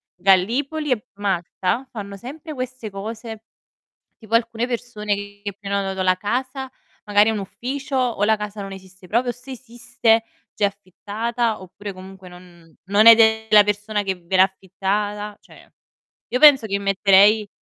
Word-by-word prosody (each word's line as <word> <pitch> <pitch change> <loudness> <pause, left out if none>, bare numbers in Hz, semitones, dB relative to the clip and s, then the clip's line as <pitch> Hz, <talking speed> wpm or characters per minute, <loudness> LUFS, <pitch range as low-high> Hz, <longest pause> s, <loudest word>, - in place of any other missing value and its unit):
Gallipoli 240 - +1
e 245 0 -1
Malta, 195 +4 -2
fanno 200 -3 -7
sempre 295 - -9
queste 255 -4 -6
cose, 220 +2 -7 0.8
tipo 220 -1 -7
alcune 230 0 +1
persone 230 -4 -3
che 205 0 -8
che 205 - -3
prenotano 195 -2 -2
la 185 0 +3
casa, 255 +6 -3 0.3
magari 205 +1 +4
un 220 - -2
ufficio 260 +8 -5
o 245 -5 +1
la 220 +1 +3
casa 210 0 -6
non 195 0 -7
esiste 190 0 -13
proprio, 240 +5 0
se 255 +2 -11
esiste 235 -2 0 0.3
già 210 - -1
è - - +6
affittata 210 +3 -4
oppure 200 +2 -8
comunque 190 0 -12
non 175 -2 -17
non 205 +3 +3
è 230 - +12
della 220 -2 +5
persona 210 +1 -1
che 190 -1 -2
ve 180 +2 -3
l'ha 185 - +7
affittata, 205 +2 -2
cioè - - -18 0.6
io 250 - -1
penso 280 -6 +7
che 200 -1 -1
metterei. 200 +2 +4
210 Hz, 155 wpm, -21 LUFS, 195-235 Hz, 0.8 s, è